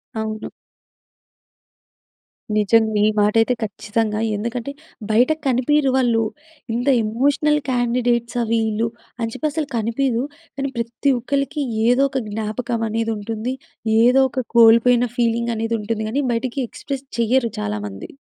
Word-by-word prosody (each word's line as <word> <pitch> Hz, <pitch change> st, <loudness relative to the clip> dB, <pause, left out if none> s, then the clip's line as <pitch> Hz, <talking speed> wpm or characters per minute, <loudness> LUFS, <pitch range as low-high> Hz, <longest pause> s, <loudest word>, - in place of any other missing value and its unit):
అవును. 220 Hz, 0 st, -4 dB, 2.1 s
నిజంగా. 220 Hz, +1 st, +3 dB
ఈ -, -, +5 dB
మాటైతే 225 Hz, +4 st, +3 dB
ఖచ్చితంగా. 215 Hz, +1 st, -2 dB, 0.2 s
ఎందుకంటే 235 Hz, +5 st, -3 dB, 0.4 s
బయట 245 Hz, +6 st, +4 dB, 0.2 s
కనిపీయరు 265 Hz, +2 st, +2 dB
వాళ్ళు. 235 Hz, -3 st, +2 dB, 0.5 s
ఇంత 245 Hz, +3 st, -2 dB, 0.2 s
ఎమోషనల్ 285 Hz, +7 st, +2 dB
క్యాండిడేట్సా 240 Hz, -1 st, 0 dB
వీళ్ళు 225 Hz, 0 st, +1 dB, 0.3 s
అని 225 Hz, 0 st, -1 dB
చెప్పి 310 Hz, -, -1 dB
అసలు 310 Hz, -1 st, -2 dB
కనిపీయవు. 235 Hz, +2 st, 0 dB, 0.3 s
కానీ 275 Hz, 0 st, -2 dB
ప్రతి 235 Hz, +4 st, 0 dB
ఒక్కళ్ళకి 280 Hz, +3 st, -1 dB, 0.2 s
ఏదో 250 Hz, +3 st, +4 dB
ఒక 265 Hz, -, -1 dB
జ్ఞాపకం 225 Hz, +2 st, -3 dB
అనేది 225 Hz, +1 st, -1 dB
ఉంటుంది. 225 Hz, +4 st, -4 dB, 0.5 s
ఏదో 250 Hz, +3 st, +5 dB
ఒక 255 Hz, -1 st, -3 dB
కోల్పోయిన 235 Hz, +2 st, +6 dB
ఫీలింగ్ 235 Hz, 0 st, +1 dB
అనేది 225 Hz, +1 st, -1 dB
ఉంటుంది 220 Hz, +1 st, -2 dB
గానీ 280 Hz, +5 st, 0 dB
బయటికి 245 Hz, +3 st, -2 dB
ఎక్స్ప్రెస్ 275 Hz, -1 st, -6 dB
చేయరు 235 Hz, 0 st, +2 dB
చాలామంది. 105 Hz, -1 st, -5 dB
235 Hz, 120 wpm, -21 LUFS, 220-255 Hz, 2.1 s, కోల్పోయిన